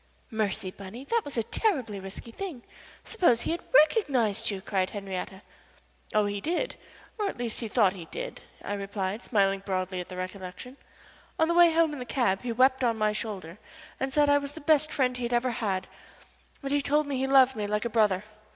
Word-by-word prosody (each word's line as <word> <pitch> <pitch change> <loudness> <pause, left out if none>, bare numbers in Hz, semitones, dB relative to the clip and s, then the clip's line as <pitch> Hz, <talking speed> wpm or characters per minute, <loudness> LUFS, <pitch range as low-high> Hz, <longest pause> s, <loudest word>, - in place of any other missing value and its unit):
"Mercy, 205 -4 -1
Bunny, 200 +7 -9
that 465 +9 +1
was 285 -3 -7
a 230 - +2
terribly 250 - 0
risky 195 +4 -8
thing. 315 -5 -6 0.4
Suppose 340 - +2
he - - -2
had 340 - -2
recognized 285 - +3
you?" 200 -2 -3
cried 190 -1 -1
Henriette. 195 -1 -6 0.7
"Oh, 215 -1 +3
he 205 0 -2
did 350 - -1 0.4
or 415 - +1
at - - -7
least 235 -2 -1
he 230 - -3
thought 210 -4 +3
he 180 -4 -9
did," - - -6 0.2
I 205 - -2
replied, 200 +1 -3
smiling 195 -4 +2
broadly 185 -1 -2
at 180 - -9
the 180 - -7
recollection. 185 +7 -7 0.6
"On 320 - +3
the 340 - +2
way 345 -1 +7
home 325 -1 +3
in 290 - -6
the 250 - -5
cab 230 -6 +1
he 245 - -3
wept 260 +2 +3
on 230 -2 +2
my 215 -1 +2
shoulder 200 -4 -5 0.4
and 265 0 -1
said 295 +1 +4
I 285 0 +5
was 285 0 -6
the 320 - -9
best 305 0 +3
friend 255 -2 +1
he 245 -1 -3
ever 245 +1 +1
had, 200 -5 -1 0.8
and 280 +1 0
told 300 +2 +2
me 280 -2 -2
he 265 - 0
loved 265 -1 +6
me 210 -2 -2
like 210 +2 -1
a - - 0
brother. 210 -4 +3
230 Hz, 205 wpm, -28 LUFS, 200-280 Hz, 0.8 s, way